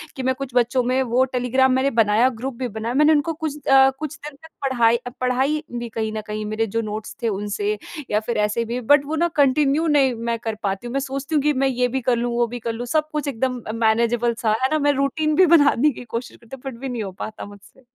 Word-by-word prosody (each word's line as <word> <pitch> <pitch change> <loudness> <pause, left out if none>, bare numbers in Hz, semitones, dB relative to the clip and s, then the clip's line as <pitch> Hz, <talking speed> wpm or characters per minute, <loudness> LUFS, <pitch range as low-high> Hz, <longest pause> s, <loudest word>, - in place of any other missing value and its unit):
कि 265 - -5
मैं 260 0 +1
कुछ 265 -2 -7
बच्चों 245 +1 +2
में 255 +2 +1
वो 255 +2 +5
टेलीग्राम 255 +1 +2
मैंने 260 +2 +2
बनाया 220 +4 +3
ग्रुप 265 0 -3
भी 255 - -1
बनाया 230 +2 -3
मैंने 300 +2 +5
उनको 310 +2 +1
कुछ 300 -2 -6
अ, 270 0 +7
कुछ 310 -1 -5
दिन 300 -1 -8
तक 320 +3 -16 0.2
पढ़ाई, 235 -2 +3 0.2
पढ़ाई 265 +5 +1 0.2
भी 235 0 -5
कहीं 220 -1 -3
न 215 - -3
कहीं 215 0 -4
मेरे 215 +1 -1
जो 230 - +2
नोट्स 215 0 -6
थे - - +2
उनसे 205 +1 -2 0.3
या 210 - +3
फिर 235 +2 -3
ऐसे 230 +2 -2
भी 250 - -1
बट 285 -1 +6
वो 310 +3 -3
ना 340 +2 +2
कंटिन्यू 285 +3 +2
नहीं 275 -4 +3
मैं 230 0 -2
कर 225 -1 -4
पाती 195 +4 -2
हूँ। - - -6
मैं 275 - +1
सोचती 275 +3 -4
हूँ 295 - +3
कि 300 - +3
मैं 270 +1 +1
ये 250 -1 +1
भी 265 - 0
कर 250 0 +2
लूँ 240 +1 -1
वो 240 0 +2
भी 245 +1 -6
कर 230 0 -3
लूँ। 235 +2 -5
सब 305 +5 0
कुछ 300 -1 -3
एकदम 255 -1 -2
अ, 215 - -2
मैनेजेबल 235 +1 +1
सा 220 - +2
है 260 - +3
ना 310 - +2
मैं 290 0 +3
रूटीन 300 +3 0
भी 370 - +6
बनाने 300 -4 +4
की 250 - -9
कोशिश 235 +1 -6
करती 235 +3 -11
हूँ 265 - -18
फिर 265 -4 -7
भी 270 +1 -5
नहीं 240 -3 -3
हो 195 - -5
पाता 215 +3 -7
मुझसे। 205 +5 -16
250 Hz, 260 wpm, -22 LUFS, 230-280 Hz, 0.3 s, अ